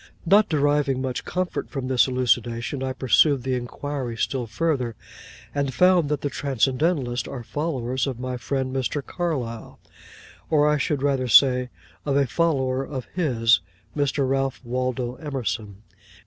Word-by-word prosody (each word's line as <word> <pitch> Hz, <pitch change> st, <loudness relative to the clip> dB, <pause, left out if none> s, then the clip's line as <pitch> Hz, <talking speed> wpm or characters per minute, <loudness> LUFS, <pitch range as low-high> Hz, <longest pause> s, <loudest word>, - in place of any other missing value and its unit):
Not 205 Hz, +5 st, +5 dB
deriving 145 Hz, -3 st, +2 dB
much 130 Hz, -1 st, -3 dB
comfort 185 Hz, 0 st, -3 dB
from 135 Hz, -3 st, -4 dB
this 130 Hz, -1 st, +3 dB
elucidation, 120 Hz, 0 st, 0 dB
I 130 Hz, 0 st, -1 dB
pursued 130 Hz, +1 st, +3 dB
the 130 Hz, 0 st, -1 dB
inquiry 125 Hz, 0 st, -4 dB
still 125 Hz, 0 st, -1 dB
further, 125 Hz, -2 st, -1 dB, 0.6 s
and 140 Hz, -3 st, -1 dB
found 180 Hz, -3 st, +4 dB
that 150 Hz, -2 st, -1 dB
the 145 Hz, -, -1 dB
Transcendentalists 135 Hz, +1 st, 0 dB
are 125 Hz, -3 st, -6 dB
followers 130 Hz, -2 st, -2 dB
of 130 Hz, -3 st, -4 dB
my 130 Hz, 0 st, -3 dB
friend 130 Hz, +1 st, -2 dB
Mr. 130 Hz, +2 st, -2 dB
Carlyle, 130 Hz, -10 st, -4 dB, 0.7 s
or 150 Hz, -1 st, +4 dB
I 150 Hz, -1 st, +2 dB
should 140 Hz, -1 st, -1 dB
rather 135 Hz, -3 st, +1 dB
say, 125 Hz, +1 st, +5 dB, 0.3 s
of 140 Hz, -1 st, +1 dB
a 140 Hz, -, +3 dB
follower 135 Hz, -2 st, 0 dB
of 135 Hz, -2 st, -6 dB
his, 120 Hz, -10 st, +3 dB, 0.4 s
Mr. 145 Hz, -1 st, +1 dB
Ralph 135 Hz, 0 st, 0 dB
Waldo 125 Hz, 0 st, -2 dB
Emerson. 115 Hz, -8 st, -4 dB
130 Hz, 145 wpm, -24 LUFS, 125-145 Hz, 0.7 s, Not